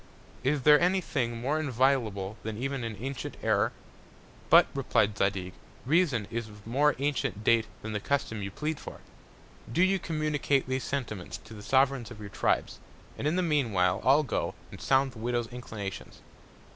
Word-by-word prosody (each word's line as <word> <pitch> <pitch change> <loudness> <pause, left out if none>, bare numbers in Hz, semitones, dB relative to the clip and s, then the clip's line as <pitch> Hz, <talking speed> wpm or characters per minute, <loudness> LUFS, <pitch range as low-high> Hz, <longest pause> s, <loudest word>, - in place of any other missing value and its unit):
Is 135 +1 +1
there 150 0 +7
any 180 +2 +3
Thing 120 -9 -2
more 140 +6 0
inviolable 120 -8 +1
than 110 -1 -5
even 135 +1 -2
an 115 -2 -4
antient 130 +5 -5
Error? - - +2 0.8
But, - - +8
replied 105 0 +1
Zadig, 95 -2 -1 0.3
Reason 140 - +2
is 115 -1 -3
of 105 0 -14
more 140 +5 +2
antient 135 -6 -1
Date 115 0 +3 0.2
than 110 0 -4
the 105 - -1
Custom 110 -3 -1
you 100 - -3
plead 150 +8 -3
for. - - -9 0.7
Do 170 +10 +3
you 190 +1 +3
communicate 150 -4 0
these 130 0 -1
Sentiments 115 -9 -4
to - - -12
the 105 - -9
Sovereigns 130 0 +2
of 120 -3 -10
your 105 -1 -7
Tribes, 95 - 0 0.4
and 145 - -2
in 155 - +1
the 185 - +1
mean 145 -9 +1
while 90 -1 +2
I'll 140 +4 +5
go, 140 - -2 0.2
and - - -10
sound 135 0 +3
the 115 - -12
Widow's 120 +1 -1
Inclinations. 110 -5 -7
125 Hz, 175 wpm, -29 LUFS, 110-145 Hz, 0.8 s, But